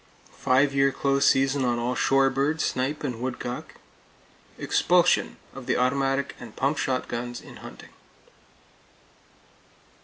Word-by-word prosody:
Five 135 +2 +3
year 135 0 +3
close 140 0 +1
seasons 135 +1 +3
on 120 -1 +1
all 120 +1 -1
shore 135 +1 +3
birds, 150 +4 0
snipe 135 +4 -2
and 125 -5 -4
woodcock. 125 -1 -5 0.8
Expulsion - - +2 0.2
of - - -10
the - - +1
automatic 135 +2 0
and 120 -3 -11
pump 140 +3 0
shotguns, 120 -2 -3
in - - -13
hunting. - - -12
135 Hz, 120 wpm, -25 LUFS, 125-140 Hz, 0.8 s, Five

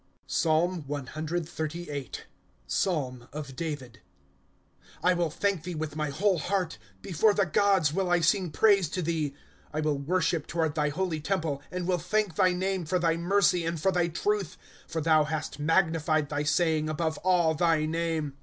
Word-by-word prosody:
PSALM 165 +2 +1
CXXXTIIL 155 +1 -4 0.4
[Psalm] 130 - -1
of 140 -2 -7
David. 135 -6 -5 0.7
^ - - -40 0.2
I 180 - +5
WILL 175 -2 0
thank 195 +2 -1
thee 175 +1 -5
with 155 -1 -4
my 150 -1 -1
whole 185 +5 +1
heart; 180 +1 -1 0.2
Before 200 +4 +2
the 200 - +3
gods 185 -3 +3
will 190 0 0
I 175 0 +4
sing 175 +2 +2
praise 195 0 +4
to 180 +1 -3
thee. 160 -2 0
^ - - -19 0.4
I 155 - -3
will 150 -2 0
worship 165 +1 0
toward 160 -3 0
thy 150 -1 +1
holy 165 +1 -2
temple. 155 -4 -2
And 180 -1 -4
will 180 -1 +1
thank 215 0 0
thy 185 +2 +3
name 185 0 -1
for 180 +4 +1
thy 165 -2 +2
mercy 180 +1 +2
and 165 0 -2
for 190 +5 +2
thy 175 -2 +1
truth 190 +1 -1 0.3
■ - - -22
For 160 - -1
thou 155 -1 +4
hast 155 0 -4
magnified 160 -1 +2
thy 150 0 -2
saying 155 0 +2
above 155 0 -1
all 175 -3 +3
thy 160 -1 +2
name. 160 -2 -1
165 Hz, 175 wpm, -28 LUFS, 155-180 Hz, 0.7 s, I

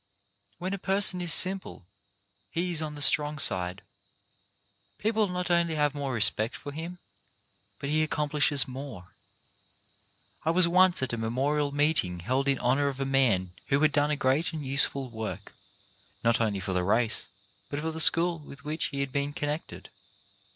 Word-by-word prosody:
When 185 +3 -4
a 200 - -4
person 190 -1 +3
is 175 -1 +1
simple, 185 - +2 0.6
he 175 +2 -2
is 165 -2 0
on 150 -1 -5
the 145 - -2
strong 150 0 +3
side. 90 -7 +1 1.1
People 220 0 0
not 180 -1 -3
only 170 -2 +1
have 150 -2 0
more 140 -2 -4
respect 110 -1 +3
for 145 - -8
him, 165 +4 -7 0.8
but 140 - -5
he 155 +2 +1
accomplishes 150 -2 +1
more. 130 -8 -9 1.3
I - - -1
was 170 +1 +4
once 180 -3 +3
at 130 - -2
a - - -2
memorial 140 +6 -1
meeting 145 - +2
held 130 +8 -1
in 135 -1 +2
honour 130 +4 +1
of 135 -1 -4
a 135 - -2
man 120 -10 +1 0.2
who 140 - +1
had 155 -1 +3
done 145 0 +1
a 150 - 0
great 145 +5 0
and 155 -3 -6
useful 135 -1 +2
work, 110 -2 -7 0.7
not 115 0 +2
only 105 -3 -1
for 95 0 -4
the 90 0 0
race 110 +4 0 0.4
but 145 - -4
for 160 +2 -3
the 160 - -6
school 165 +1 +5
with 140 -1 -14
which 155 +2 -2
he 140 -1 -4
had 140 -1 -4
been 140 +1 -2
connected. 150 +2 -6
145 Hz, 170 wpm, -27 LUFS, 130-160 Hz, 1.3 s, school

